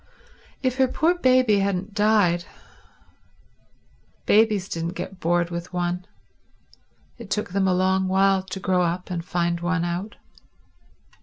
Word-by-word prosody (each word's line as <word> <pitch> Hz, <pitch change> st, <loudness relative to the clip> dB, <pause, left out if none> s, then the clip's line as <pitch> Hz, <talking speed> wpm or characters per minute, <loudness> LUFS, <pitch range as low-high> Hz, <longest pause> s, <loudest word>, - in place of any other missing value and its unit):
If 255 Hz, 0 st, 0 dB
her 265 Hz, -1 st, +4 dB
poor 320 Hz, +7 st, +1 dB
baby 255 Hz, -, +3 dB
hadn't 195 Hz, +1 st, -2 dB
died... 205 Hz, -5 st, +2 dB, 1.8 s
babies 210 Hz, -3 st, +3 dB
didn't 170 Hz, 0 st, -4 dB
get 185 Hz, +1 st, -7 dB
bored 175 Hz, +1 st, 0 dB
with 170 Hz, +1 st, -6 dB
one, 180 Hz, +1 st, -2 dB, 1.1 s
it 230 Hz, -4 st, -10 dB
took 210 Hz, -3 st, -2 dB
them 190 Hz, 0 st, +1 dB
a 185 Hz, -, +3 dB
long 190 Hz, +1 st, +1 dB
while 195 Hz, 0 st, +3 dB
to 190 Hz, 0 st, -7 dB
grow 185 Hz, -1 st, +1 dB
up 180 Hz, +2 st, -2 dB
and 170 Hz, -2 st, -3 dB
find 170 Hz, -1 st, -1 dB
one 175 Hz, 0 st, -1 dB
out. 180 Hz, +5 st, -4 dB
185 Hz, 135 wpm, -23 LUFS, 175-205 Hz, 1.8 s, her